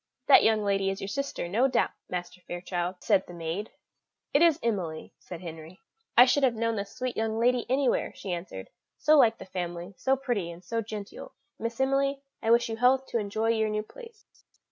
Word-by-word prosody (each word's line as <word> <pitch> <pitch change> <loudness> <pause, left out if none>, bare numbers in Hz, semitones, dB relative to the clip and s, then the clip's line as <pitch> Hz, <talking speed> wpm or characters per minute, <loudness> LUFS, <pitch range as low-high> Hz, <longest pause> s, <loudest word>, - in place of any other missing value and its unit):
"That - - +7
young 220 -1 +3
lady 195 -1 +1
is 195 0 -3
your 195 - -5
sister, 275 -4 -3
no 225 +9 +2
doubt, 250 -3 +1 0.2
Master 180 0 -5
Fairchild," 175 0 -3
said 200 -3 +2
the 175 - -10
maid. 170 +5 -4 0.6
"It 285 - +4
is 335 -2 +5
Emily," 180 -9 -2
said 175 -1 -9
Henry. 165 +1 -9 0.4
"I 245 - +10
should 275 +3 +2
have 255 -3 +3
known 230 0 0
the 200 -1 -2
sweet 250 +5 -5
young 220 0 -1
lady 245 +1 +2
anywhere," 260 0 +1
she 195 - -6
answered; 170 - -7 0.3
"so 310 - +4
like 230 -6 +5
the - - -10
family, 175 0 -5
so 265 - +2
pretty 245 -10 -2
and 170 +1 -10
so 230 +5 -2
genteel. 210 -2 -8 0.3
Miss 230 +1 -4
Emily, 275 +1 +1 0.2
I 225 - -1
wish 235 +1 +5
you 225 -1 -4
health 255 +2 +3
to 235 - 0
enjoy 215 +2 -1
your 220 -1 +2
new 215 0 -1
place." 460 - -14
220 Hz, 200 wpm, -28 LUFS, 185-250 Hz, 0.6 s, I